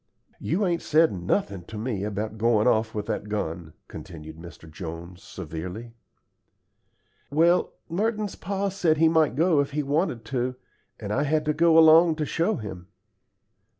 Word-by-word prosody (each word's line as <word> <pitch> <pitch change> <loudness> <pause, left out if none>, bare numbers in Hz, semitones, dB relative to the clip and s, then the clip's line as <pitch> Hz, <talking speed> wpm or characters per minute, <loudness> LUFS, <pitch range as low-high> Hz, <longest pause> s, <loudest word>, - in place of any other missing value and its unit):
"You 195 +6 0
ain't 170 -2 0
said 160 +1 +3
nothin' 95 - -2
to 110 - -9
me 110 -3 -3
about 105 +1 -4
goin' 115 0 +3
off 110 -2 +1
with 105 -1 -3
that 105 - -4
gun," 85 -6 -4
continued 80 -2 -10
Mr. 85 0 -12
Jones, 85 +2 -8
severely. 90 +7 -7 1.4
"Well, 170 +4 +2
Merton's 210 +3 -1
pa 200 +2 -2
said 175 -5 +1
he 165 +1 +5
might 160 -2 +2
go 165 0 +3
if 140 0 -1
he 150 0 -1
wanted 140 -4 -1
to, 125 -1 -2 0.4
and 105 -1 -4
I 135 - +1
had 150 +1 0
to 150 - +1
go 165 +1 +4
along 160 +1 +7
to 155 -1 -2
show 170 +8 0
him." 95 -5 -8
130 Hz, 155 wpm, -25 LUFS, 100-165 Hz, 1.4 s, along